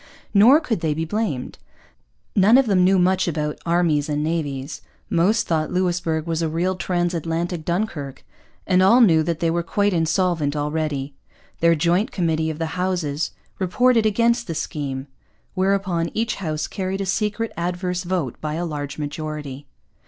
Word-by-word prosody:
Nor 230 +9 +7
could 250 - -2
they 155 -2 -1
be 160 +1 -2
blamed. 180 - -3 0.8
None 210 +5 +6
of 270 - +4
them 195 -5 +3
knew 190 +1 +4
much 185 +1 +2
about 150 -2 -2
armies 165 -4 +2
and 150 0 -1
navies; 150 -3 -3 0.3
most 205 +7 +2
thought 155 -2 0
Louisbourg 175 -3 0
was 165 -1 -1
a 165 - 0
real 175 +4 0
transatlantic 175 -1 -2
Dunkirk; 160 -7 -3 0.4
and 185 -1 +3
all 195 +7 +6
knew 170 -10 +5
that 165 0 -2
they 165 -1 +2
were 170 +1 0
quite 200 +4 0
insolvent 165 -2 +1
already. 150 -2 -2 0.5
Their 170 0 +4
joint 175 +6 +1
committee 160 -3 0
of 155 - -4
the 165 - -2
two - - -5
Houses 170 -5 -1 0.3
reported 225 +4 +3
against 235 +3 +1
the 165 - -4
scheme; 140 -4 -4 0.5
whereupon 185 -3 0
each 225 +1 -1
House 155 -5 -2
carried 190 0 -3
a - - -1
secret 210 +3 -1
adverse 180 +1 -2
vote 175 -8 -3
by 155 0 -3
a 175 +2 -2
large 145 -3 -5
majority. 150 -2 -5
170 Hz, 160 wpm, -22 LUFS, 155-190 Hz, 0.8 s, Nor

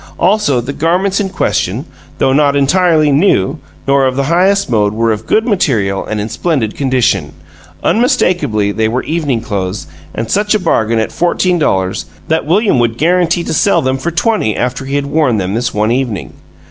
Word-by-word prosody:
Also, 185 - +2
the 125 +4 -4
garments 185 +6 0
in 200 -2 -1
question, - - -1 0.3
though 130 - +2
not 140 0 +3
entirely 155 +1 +3
new, 140 - +2 0.3
nor 135 -1 +3
of 130 - -2
the 140 - 0
highest 185 +6 +2
mode, 105 -4 +1
were 115 0 +1
of 105 - -4
good 220 - +2
material 115 - 0
and 110 - -4
in 105 - -3
splendid 120 -3 -1
condition. 125 - 0 0.5
Unmistakably 180 - +1
they 110 +2 0
were 125 +4 -2
evening 150 -7 -1
clothes, 100 -4 -4 0.3
and 115 0 -4
such 210 +1 +1
a - - +1
bargain 115 - +1
at 110 - -1
fourteen 175 +1 0
dollars 95 -10 0 0.2
that 160 -2 0
William 195 - +2
would 115 -1 0
guarantee 175 +2 +1
to - - -3
sell 170 -1 +2
them 130 +1 -1
for 170 - -2
twenty 170 - 0
after 130 +2 -2
he 135 +1 -3
had 145 0 0
worn 140 -5 +1
them 95 -1 -2
this 120 +2 -1
one 105 +2 0
evening. 120 - -2
140 Hz, 185 wpm, -13 LUFS, 110-175 Hz, 0.5 s, not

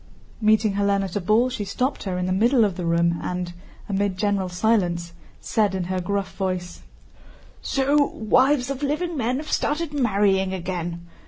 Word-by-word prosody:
Meeting 215 -1 +3
Hélène 200 0 +1
at 190 -3 -5
a 205 - 0
ball 215 +7 +3
she 240 -4 -3
stopped 250 +8 -2
her 185 -2 -2
in 180 - -1
the 185 - -1
middle 230 +4 +4
of 195 -4 -2
the 175 -2 -3
room 170 0 +2
and, 180 -1 -3 0.3
amid 200 -1 -1
general 200 -2 0
silence, 180 -3 0 0.3
said 210 -3 0
in 185 - -1
her 185 +1 -2
gruff 200 +1 -2
voice: 185 -2 -3 0.8
"So 285 +2 +2
wives 255 +4 +2
of 275 0 -5
living 310 +4 -1
men 250 -1 0
have 300 +2 -6
started 300 +1 -1
marrying 200 -7 +2
again! 175 -1 -4
200 Hz, 170 wpm, -23 LUFS, 180-245 Hz, 0.8 s, middle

